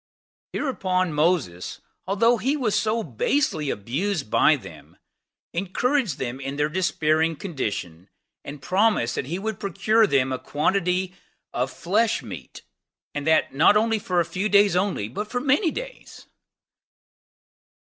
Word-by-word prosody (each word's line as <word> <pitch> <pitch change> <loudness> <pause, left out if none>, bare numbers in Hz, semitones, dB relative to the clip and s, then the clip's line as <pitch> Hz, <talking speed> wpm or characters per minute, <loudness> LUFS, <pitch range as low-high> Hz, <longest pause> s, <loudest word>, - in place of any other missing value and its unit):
Hereupon 185 - -1
Moses, 150 - 0 0.3
although 230 +5 +3
he 265 +7 0
was 235 -7 0
so 215 +2 +1
basely 155 - 0
abused 140 - -2
by - - +5
them - - -12 0.6
encouraged 200 - 0
them 130 0 -4
in 135 +1 -5
their 150 +1 0
despairing 160 -2 +1
conditioned 100 - -5 0.4
and 140 -1 -9
promised 190 - +2
that 130 - -3
he 170 +5 -3
would 215 +1 -4
procure 210 +3 +2
them 135 -5 +2
a 130 - -2
quantity 180 +4 0 0.4
of 125 +2 -1
flesh 220 - 0
meat, - - -9 0.5
and 145 +1 -4
that 160 -3 +3
not 155 +9 +5 0.3
for 180 -2 0
a 170 - +2
few 185 +5 -2
days 200 -2 +5
only, 180 - 0
but 210 - -5
for 245 - -1
many 285 +7 +2
days. - - -8
180 Hz, 135 wpm, -24 LUFS, 145-215 Hz, 0.6 s, by